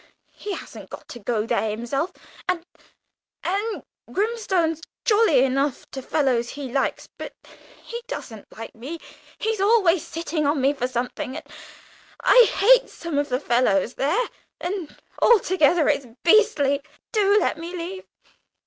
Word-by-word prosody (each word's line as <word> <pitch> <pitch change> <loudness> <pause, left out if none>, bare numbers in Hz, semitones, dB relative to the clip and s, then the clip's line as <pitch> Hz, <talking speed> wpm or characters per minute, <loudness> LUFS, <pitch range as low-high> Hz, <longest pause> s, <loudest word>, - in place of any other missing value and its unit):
He 410 - -5
hasn't - - -9
got - - -10
to 240 - -8
go 215 0 -1
there 220 -1 0
himself! 240 - -2 0.4
And 350 -2 0 0.8
and 410 +5 -2 0.3
Grimstone's 380 -7 0 0.2
jolly 415 - +5
enough 275 +1 0
to 265 - -5
fellows 255 -4 +1
he 275 -3 -6
likes, 270 +1 -1
but - - -7 0.5
he 470 0 -6
doesn't 225 - -7
like 225 - -7
me 270 +9 -7 0.4
he's 440 -2 -1
always 390 -6 +4
sitting 325 -2 -2
on 290 0 +1
me 270 +2 +3
for 250 -3 -2
something 250 +1 -3
and - - -7 0.8
I - - +7
hate - - +5
some 335 -4 -3
of 290 - -1
the 250 0 0
fellows 235 -4 +2
there, 355 - +1 0.3
and 355 -3 -5 0.2
altogether 355 -7 +4
it's 280 -3 +1 0.2
beastly. 330 -8 +4 0.3
Do 415 -2 +4
let 320 - 0
me 335 +1 -6
leave! 360 +2 -6
320 Hz, 140 wpm, -24 LUFS, 260-395 Hz, 0.8 s, I